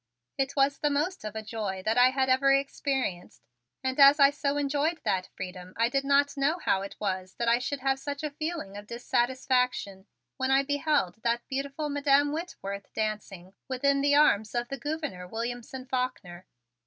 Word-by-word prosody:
It 275 0 -1
was 275 0 +2
the 295 - +1
most 305 +7 -1
of 215 0 -6
a 220 - -4
joy 210 -4 -4
that 220 - +2
I 250 +1 +6
had 260 0 0
ever 265 +1 +4
experienced. 270 - -1 0.4
And 260 +1 -2
as 280 +1 +8
I 280 0 +7
so 285 0 -1
enjoyed 290 +3 0
that 185 -1 -1
freedom 180 0 -8
I 230 +1 +3
did 275 +1 0
not 280 +1 +3
know 285 +4 +1
how 195 - +1
it 195 - -7
was 185 -2 -3
that 235 - -2
I 235 +1 +4
should 265 +2 -3
have 270 0 +1
such 285 +1 -5
a 300 - -2
feeling 310 - -5
of 205 0 -9
dissatisfaction 245 -4 0 0.3
when 260 -1 -1
I 270 +1 +4
beheld 285 - 0
that 235 +1 -1
beautiful 275 +3 -3
Madam 285 0 +3
Whitworth 200 - -6
dancing 210 -4 -4
within 275 +2 +1
the 285 0 +3
arms 220 -7 +3
of 240 0 -1
the 275 - -4
Gouverneur 290 - -4
Williamson 245 +4 -5
Faulkner. 230 -9 -4
265 Hz, 180 wpm, -28 LUFS, 215-285 Hz, 0.4 s, as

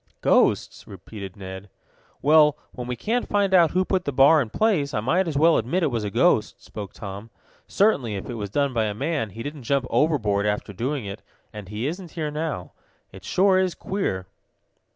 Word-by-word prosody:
"Ghosts?" - - +2
repeated 100 0 -9
Ned. 95 +1 -8 0.5
"Well, 150 0 +5
when 125 -1 -7
we 125 - -3
can't 230 - -2
find 200 -2 +1
out 170 -3 +6
who 185 +4 +1
put 185 -1 0
that 145 - -1
bar 140 +4 +6
in 120 - -3
place 155 - +1
I - - +1
might 170 - +1
as 155 -4 -2
well 160 +2 +5
admit 175 +10 -1
it 150 - +1
was 115 -3 -2
a 105 - -2
ghost," - - +2
spoke 100 -3 -8
Tom. 100 +1 -8 0.4
"Certainly, 140 - +1
if 95 - -6
it 125 - -5
was 105 -3 -5
done 140 +5 0
by 115 -2 +1
a 105 -1 -3
man, 140 -2 -2
he 115 +4 -8
didn't 145 0 -6
jump 135 +2 0
overboard 110 -10 +1
after 105 0 -2
doing 130 +4 -3
it, 100 +2 -7 0.3
and 105 -3 -9
he 105 +3 -4
isn't 175 +3 -5
here 155 -3 -3
now. 150 - -4 0.4
It 95 -1 -13
sure 185 - +3
is 185 -2 0
queer!" 185 - -3
135 Hz, 200 wpm, -24 LUFS, 105-165 Hz, 0.5 s, out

